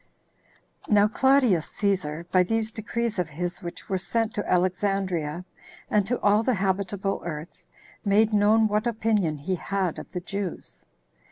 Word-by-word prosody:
1. 210 - +3
Now 205 0 +6
Claudius 250 - +3
Cæsar, 170 -6 -1
by 185 - +5
these 220 +4 0
decrees 225 0 -3
of 175 -3 -1
his 175 +4 -4
which 175 -2 -7
were 190 -1 -1
sent 225 +3 -1
to 205 - -3
Alexandria, 180 -3 0 0.5
and 205 -2 +2
to 245 +2 0
all 205 +1 +4
the 250 +1 +1
habitable 195 0 -1
earth, 160 0 -7 0.4
made 215 +1 +3
known 215 +2 +4
what 210 +2 0
opinion 215 -8 0
he 150 +7 -3
had 185 -1 -2
of - - -10
the 180 - -2
Jews. 195 0 -6
200 Hz, 155 wpm, -26 LUFS, 180-215 Hz, 0.5 s, Now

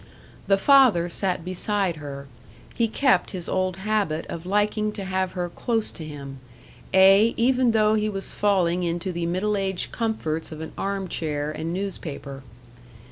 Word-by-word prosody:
The 195 - +4
father 230 -8 +5
sat 180 -1 -2
beside 185 -1 -1
her; 140 -2 -8 0.5
he 230 - +1
kept 235 -4 +2
his 175 - -6
old 185 -1 -1
habit 195 -6 -1
of 170 +1 -6
liking 210 +2 +1
to 195 - -6
have 185 -1 -1
her 180 -1 -2
close 225 +5 -1
to 160 - -9
him; 140 -3 -8 0.5
ay, 195 +4 +6
even 250 +1 +3
though 215 -1 +3
he 215 0 +1
was 195 -2 -4
falling 180 -4 +2
into 175 +2 -2
the 170 -1 -2
middle 190 +5 0
aged 190 -2 -2
comforts 165 -10 -2
of 155 - -7
an 160 - -6
arm 195 -1 -2
chair 150 -3 -2
and 160 +2 -4
newspaper. 160 -7 -5
190 Hz, 160 wpm, -24 LUFS, 170-210 Hz, 0.5 s, ay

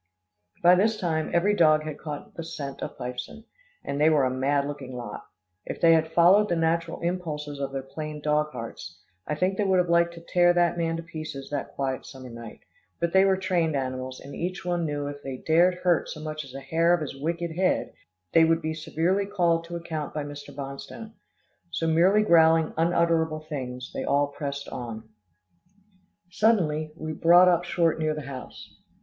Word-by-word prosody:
By 175 +1 +8
this 215 +4 +2
time, 160 -4 -1
every 195 +5 +2
dog 155 -4 +4
had 155 -1 -6
caught 150 -2 -7
the 165 - -6
scent 145 -4 -6
of - - -6
Fifeson, 125 - -6 0.4
and 140 +1 -2
they 155 - +6
were 150 -4 +3
a 130 - 0
mad 140 +2 +1
looking 140 -3 -6
lot. 120 -4 -7 0.4
If - - -6
they 165 -1 +6
had 160 0 +2
followed 190 +6 +5
the 175 - +1
natural 165 0 0
impulses 155 -5 -3
of 140 -1 -3
their 135 -1 -4
plain 150 +2 -6
dog 150 +1 +1
hearts, 95 - -8 0.3
I 150 - -1
think 185 +4 0
they - - +3
would 190 -2 +3
have 180 -1 +2
liked 170 0 +3
to 170 - -10
tear 175 0 +4
that 175 -1 +2
man 165 -1 -1
to 165 - -6
pieces 155 -4 -7
that 145 -2 -4
quiet 135 -1 -3
summer 130 -2 -10
night, 115 -1 -10 0.4
but 170 0 -1
they 190 0 +6
were 190 -1 +3
trained 175 -5 0
animals, 130 -1 -3
and 140 - -10
each 180 +1 -4
one 175 -2 0
knew 145 -1 -3
if 145 0 -6
they 135 -2 -6
dared 170 +6 +3
hurt 175 -2 +2
so 155 - -7
much 155 0 -5
as 135 -1 -12
a 135 - -6
hair 165 +5 +3
of 175 - -5
his 145 -3 -5
wicked 170 +2 -2
head, 185 +1 0 0.4
they 165 - +7
would 165 0 +2
be 160 0 -1
severely 170 +5 0
called 170 -4 +1
to 170 0 -7
account 160 -4 -5
by 150 - -2
Mr. 145 0 -8
Bonstone. 140 +11 -8 0.6
So 165 - -2
merely 180 +6 +4
growling 165 -4 +4
unutterable 165 -1 +1
things, 125 -4 -5
they - - -3
all 145 0 +2
pressed 140 -1 -5
on. 115 -2 -7 1.2
Suddenly, 165 -8 +2
we 155 -1 -5
brought 175 +4 +6
up 175 -1 +3
short 170 -2 +1
near 155 -1 0
the 155 - -5
house. 130 -2 -9
160 Hz, 195 wpm, -26 LUFS, 145-170 Hz, 1.2 s, By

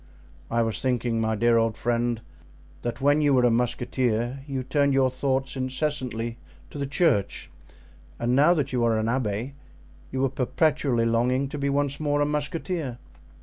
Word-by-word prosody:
"I 115 0 +2
was 115 -1 -1
thinking, 120 -3 0
my 110 0 0
dear 115 +2 +3
old 115 -1 +1
friend, 120 -1 0 0.6
that 120 +2 -4
when 145 +2 +4
you 145 -2 +4
were 125 - +4
a 120 - +4
musketeer 120 +1 0
you 135 -2 -3
turned 140 +1 +1
your 130 -1 +3
thoughts 135 +1 -1
incessantly 130 -3 -2 0.3
to 145 - -7
the 140 - -2
church, 135 - 0 0.7
and 120 +1 0
now 150 +6 +5
that 140 -4 -1
you 125 -2 +1
are 115 -1 +2
an 110 - 0
abbé 115 +1 -1 0.6
you 130 +1 +1
are - - +1
perpetually 135 -2 +1
longing 125 +4 +1
to 145 - -5
be 140 0 0
once 140 0 0
more 145 -1 0
a 145 - +3
musketeer." 150 -2 -3
130 Hz, 170 wpm, -25 LUFS, 115-140 Hz, 0.7 s, now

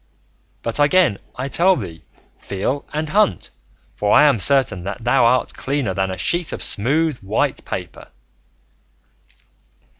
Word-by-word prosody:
But 115 +4 -3
again 145 - +3 0.2
I 130 +2 -4
tell 185 +6 +3
thee, 80 - -7 0.3
feel 100 +9 -4
and 155 +1 -3
hunt, 170 - +1 0.4
for 105 0 -1
I 150 - +7
am 145 -7 +4
certain 130 -7 +2
thou 115 +5 +1
art 125 +2 +2
cleaner 135 -8 -2
than 95 +1 -1
a 95 - -5
sheet 170 - 0
of - - -5
smooth 145 +6 0
white 100 +3 -1
paper." - - -7
125 Hz, 130 wpm, -20 LUFS, 100-150 Hz, 0.4 s, I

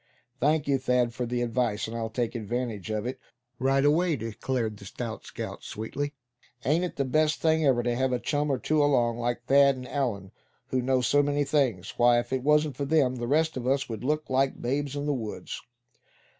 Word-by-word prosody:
"Thank 150 +2 +2
you, 140 -1 +2
Thad, 125 -2 +1
for 125 0 -3
the 120 0 -1
advice, 115 -3 0
and 115 - -6
I'll 115 -1 -2
take 120 +1 -2
advantage 115 -2 -3
of 110 0 -2
it 125 - -4 0.4
right 135 +2 +2
away," 165 +3 +3
declared 115 -1 -3
the 100 - -12
stout 115 +3 -6
scout, - - -7
sweetly. 145 +7 -4 0.5
"Ain't 155 +7 +2
it 180 - -3
the 140 - 0
best 155 +4 +2
thing 160 0 +2
ever 120 -3 +3
to 120 0 0
have 130 +1 +1
a 125 - +2
chum 145 +5 -1
or 135 - +1
two 150 +3 +1
along, 120 -5 +2
like 120 0 -2
Thad 140 +1 +5
and 125 0 -8
Allan, 115 -9 -2 0.4
who 130 - +1
know 130 0 +2
so 145 +4 +4
many 145 0 +1
things? 130 -11 0
Why, 120 0 +5
if 120 +2 -4
it 130 - 0
wasn't 150 +1 +2
for 140 - -1
them, 135 -4 +2
the 120 0 -3
rest 160 +4 +2
of 125 -1 -4
us 135 +1 +1
would 110 -1 -5
look 150 +3 0
like 135 +1 +1
the - - -14
babes 140 +3 -1
in 145 0 -3
the 145 - +1
woods." 110 -5 -5
130 Hz, 215 wpm, -27 LUFS, 120-145 Hz, 0.5 s, Thad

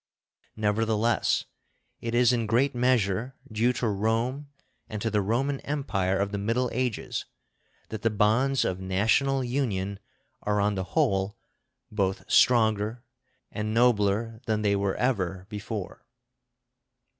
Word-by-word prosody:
Nevertheless, 110 +1 +1 0.5
it 115 0 -3
is 125 0 +5
in 115 -2 0
great 125 +6 +2
measure 120 -1 +1 0.2
due 115 +3 +2
to 120 - -1
Rome 115 +7 -1 0.4
and 110 - -4
to 115 +2 -2
the 105 -1 +2
Roman 130 +7 0
Empire 95 -10 -1
of 100 +1 -1
the 100 - -2
Middle 115 +5 0
Ages 125 -2 -2 0.6
that 110 -1 -5
the 115 - +2
bonds 115 +6 +2
of 95 0 -1
national 110 +9 +1
union 105 -7 -2 0.4
are 105 0 0
on 105 +1 +2
the 95 -1 -2
whole 100 -9 +1 0.5
both 95 -2 -1
stronger 110 -1 +3 0.5
and 110 +1 -3
nobler 115 -1 +2
than 110 -1 0
they 100 -1 +3
were 100 -1 0
ever 95 -7 -1
before. 105 -2 -6
110 Hz, 130 wpm, -27 LUFS, 100-125 Hz, 0.6 s, is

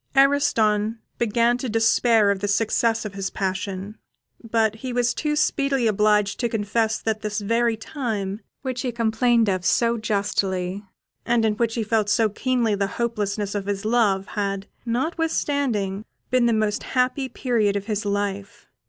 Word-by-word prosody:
Ariston 225 -6 +3 0.2
began 235 +1 +2
to 255 - -3
despair 225 -1 +3
of 200 - -1
the 205 - -2
success 225 +2 +1
of 210 - -5
his 195 -1 -3
passion, 195 +2 -4 0.4
but 220 -1 +1
he 255 +3 -5
was 245 -1 +1
too 300 -1 -1
speedily 275 -4 +1
obliged 210 -1 +2
to 240 - 0
confess 220 +1 0
that 220 -1 -2
this 210 0 -2
very 230 +2 +1
time, 215 -5 -4 0.2
which 255 -2 -3
he 255 - -2
complained 230 0 +2
of 185 -2 0
so 235 +4 +2
justly, 200 -3 -1 0.4
and 235 -1 +2
in 215 - +2
which 225 +1 -1
he 230 - 0
felt 215 -1 +1
so 220 +1 +3
keenly 240 0 0
the 200 -1 0
hopelessness 210 -3 -2
of 200 -1 -3
his 200 0 -2
love, 215 -4 +2
had, 200 -1 -2 0.2
notwithstanding, 260 - -1 0.3
been 250 -1 +3
the - - +3
most 215 -2 0
happy 260 +1 0
period 225 -7 0
of 200 0 -2
his 215 -1 -2
life. 200 -1 -3
220 Hz, 160 wpm, -23 LUFS, 205-240 Hz, 0.4 s, Ariston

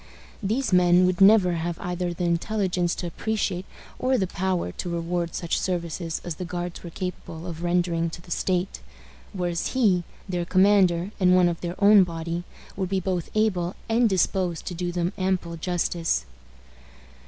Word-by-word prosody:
These 220 +3 -1
men 180 0 +5
would 180 0 0
never 195 -2 +7
have 170 0 -2
either 180 0 -2
the 175 +1 -4
intelligence 175 0 0
to - - -5
appreciate 190 0 -2 0.3
or 255 +1 +2
the 190 - +1
power 185 - -1
to 175 - -5
reward 170 0 -2
such 170 - -1
services 170 -2 -2
as 170 -3 -4
the - - -4
Guards 175 0 -5
were 175 - -6
capable 170 -2 -6
of 170 -2 -6
rendering 175 -1 +1
to 165 - -8
the 175 0 -15
state; 185 +1 -1 0.5
whereas 175 -3 -2
he, 205 -9 +3 0.2
their 180 -2 -1
commander, 185 0 +3
and 180 -1 +5
one 180 -1 +5
of 170 -1 -2
their 175 0 -4
own 205 -1 +7
body, 170 0 -4 0.3
would 190 -2 -2
be 190 0 +1
both 180 -2 -2
able 185 -5 +1
and 230 +1 +3
disposed 185 -2 0
to 180 - -4
do 175 0 -3
them 175 +1 -1
ample 185 -3 -1
justice. 170 - -1
180 Hz, 165 wpm, -25 LUFS, 170-190 Hz, 0.5 s, never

